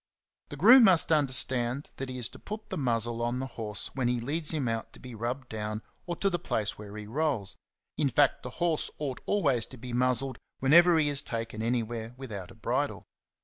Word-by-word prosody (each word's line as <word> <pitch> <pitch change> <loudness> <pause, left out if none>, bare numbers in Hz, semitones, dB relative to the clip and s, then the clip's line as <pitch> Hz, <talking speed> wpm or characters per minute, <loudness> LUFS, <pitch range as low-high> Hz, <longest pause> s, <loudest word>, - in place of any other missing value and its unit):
The 145 - -7
groom 235 - +8
must 180 -4 +5
understand 130 -3 +2
that 135 0 -4
he 130 - -5
is 120 -2 +1
to - - -13
put 215 +1 -7
the - - -3
muzzle 120 -3 0
^^ - - -2
on 120 +1 -1
the 130 - -2
horse 105 -6 -5
when 130 -3 0
he 120 0 +1
leads 145 +6 -2
him 150 -6 0
out 115 -1 -3
to - - -10
be 125 -1 -10
rubbed 120 +4 -4
down 110 -1 -4 0.2
or 175 - -2
to 195 +4 +1
the 175 - 0
place 110 -10 -1
where 105 0 -9
he 105 - -7
rolls; 130 -4 -1
^^ - - -24 0.4
in 145 -3 +3
fact, 140 +2 +3
the 125 - -6
horse 170 -3 +1
ought 140 -4 -4
always 140 - +2
to 130 - -11
be 125 +1 -8
muzzled 125 +1 0 0.2
whenever 170 +5 +6
he 155 -2 +3
is 145 -1 +1
taken 115 -2 -5
anywhere 115 0 -2
without 105 -9 -7
a - - -13
bridle. - - -2
125 Hz, 220 wpm, -29 LUFS, 115-150 Hz, 0.4 s, groom